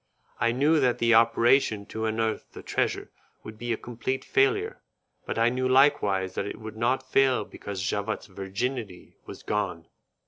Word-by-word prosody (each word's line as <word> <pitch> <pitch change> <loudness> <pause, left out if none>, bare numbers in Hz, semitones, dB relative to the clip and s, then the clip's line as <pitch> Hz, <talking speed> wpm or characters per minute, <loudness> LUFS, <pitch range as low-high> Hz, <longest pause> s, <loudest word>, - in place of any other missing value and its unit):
I 115 0 +2
knew 145 +6 +3
that 125 -3 +2
the 115 0 +3
operation 115 -1 +4
to 110 +1 -4
unearth 110 0 -2
the - - -10
treasure - - -2 0.3
would 110 0 -10
be 120 0 -3
a 115 - 0
complete 120 +2 -4
failure, 410 +2 +1 0.5
but - - -3
I 115 +1 +4
knew 130 +1 -1
likewise 105 -9 +3
that 100 - -3
it - - -7
would 110 0 -8
not 125 +4 0
fail 130 -5 +3
because 100 -2 -7
Javotte's 100 +3 -2
virginity 100 +1 -5
was - - -10
gone. - - -2
115 Hz, 165 wpm, -27 LUFS, 110-130 Hz, 0.5 s, operation